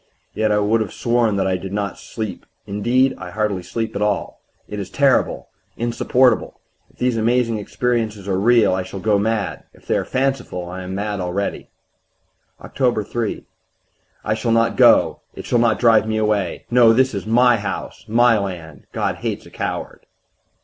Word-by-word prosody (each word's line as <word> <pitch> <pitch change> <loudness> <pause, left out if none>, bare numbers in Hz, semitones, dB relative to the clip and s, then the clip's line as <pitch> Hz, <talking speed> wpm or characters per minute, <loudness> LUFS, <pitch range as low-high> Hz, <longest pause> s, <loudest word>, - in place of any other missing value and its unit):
Yet 110 -1 0
I 105 - +3
would 105 +2 +2
have 105 - -4
sworn 120 -3 +1
that 95 -1 0
I 95 -1 +1
did 95 +1 -7
not 100 -1 -3
sleep 110 -3 -6 0.2
indeed, 120 +6 +1
I 90 - -7
hardly 105 -1 -1
sleep 115 +5 -4
at 100 - -2
all. 105 -1 -1 0.3
It 105 - -6
is 95 -2 -5
terrible, 140 +5 +1 0.3
insupportable! 120 +2 +1 0.3
If - - -28
these 125 -2 0
amazing 115 0 +1
experiences 110 -2 -2
are 95 -1 0
real 115 -1 +4
I 95 - 0
shall 95 +1 -7
go 105 +1 +2
mad; 110 0 -2
if - - -21
they - - 0
are - - 0
fanciful 130 -9 -2
I 90 +1 -6
am 95 +1 -6
mad 105 0 -3
already. 90 +2 -3 0.9
"Oct. 120 -6 -1
3. 115 -3 -3 0.8
I 105 - 0
shall 115 +1 -1
not 115 0 +2
go - - +5 0.2
it - - -8
shall 120 - +1
not 115 -2 +3
drive 115 -2 +4
me 110 0 -1
away. 105 -2 -1
No, 120 -2 +6
this 130 +2 +2
is 100 0 -5
my 120 +1 +4
house, 100 -2 -5
my 115 0 +4
land. 85 -7 -7
God - - -1
hates - - -4
a - - -15
coward.... - - -5
110 Hz, 175 wpm, -20 LUFS, 100-120 Hz, 0.9 s, No